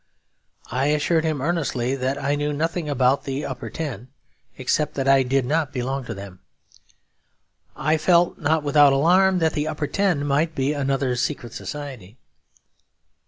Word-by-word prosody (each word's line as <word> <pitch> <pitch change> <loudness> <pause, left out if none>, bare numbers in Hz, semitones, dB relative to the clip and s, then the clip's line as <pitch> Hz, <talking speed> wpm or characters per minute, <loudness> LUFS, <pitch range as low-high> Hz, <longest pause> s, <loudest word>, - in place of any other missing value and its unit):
I 130 +3 0
assured 155 +2 +1
him 155 -4 -1
earnestly 135 -6 -1
that 130 +1 -2
I 145 0 -1
knew 145 0 -1
nothing 165 +1 -2
about 135 -1 +2
the 135 +1 -3
Upper 130 -2 -6
Ten, 130 -8 -5 0.5
except 140 +3 -1
that 135 -1 -2
I 135 0 +6
did 130 0 +1
not 150 +1 0
belong 135 0 -3
to 115 - -6
them; 100 -2 -10 1.4
I 155 +3 +1
felt, 170 +2 +3
not 155 0 +1
without 145 -1 +5
alarm, 180 +7 +4
that 160 -2 +1
the 150 0 -1
Upper 155 -1 -2
Ten 175 -4 0
might 150 +3 0
be 135 +2 0
another 135 -3 0
secret 125 -1 -3
society. 130 -8 -8
145 Hz, 155 wpm, -23 LUFS, 130-155 Hz, 1.4 s, I